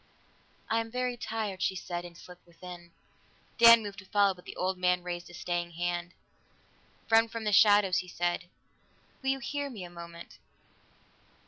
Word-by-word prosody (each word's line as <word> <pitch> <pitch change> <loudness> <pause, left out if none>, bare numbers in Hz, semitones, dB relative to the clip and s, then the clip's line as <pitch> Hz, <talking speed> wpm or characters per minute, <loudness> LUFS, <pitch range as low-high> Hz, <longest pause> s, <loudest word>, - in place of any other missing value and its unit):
"I 225 - +1
am 225 0 -4
very 250 +1 -2
tired," 215 -5 -4
she 190 - +1
said, 175 -1 -5
and 170 -1 -11
slipped 180 0 -14
within. 175 0 -11 0.7
Dan 230 -1 +9
moved 200 -1 -7
to 195 - -12
follow, 200 0 +3
but 180 -1 -18
the - - -9
old 185 +1 -1
man 180 -1 +2
raised 175 0 -5
a - - -13
staying 175 -1 -3
hand. 175 +1 -3 0.9
"Friend 225 0 +4
from 230 -1 -5
the 210 - 0
shadows," 205 -2 +6
he 180 - -6
said, 175 0 -2 0.8
"will 265 - -1
you 270 - +2
hear 285 +2 -4
me 215 -8 -8
a 175 - -9
moment?" 170 0 -11
185 Hz, 175 wpm, -30 LUFS, 175-225 Hz, 0.9 s, Dan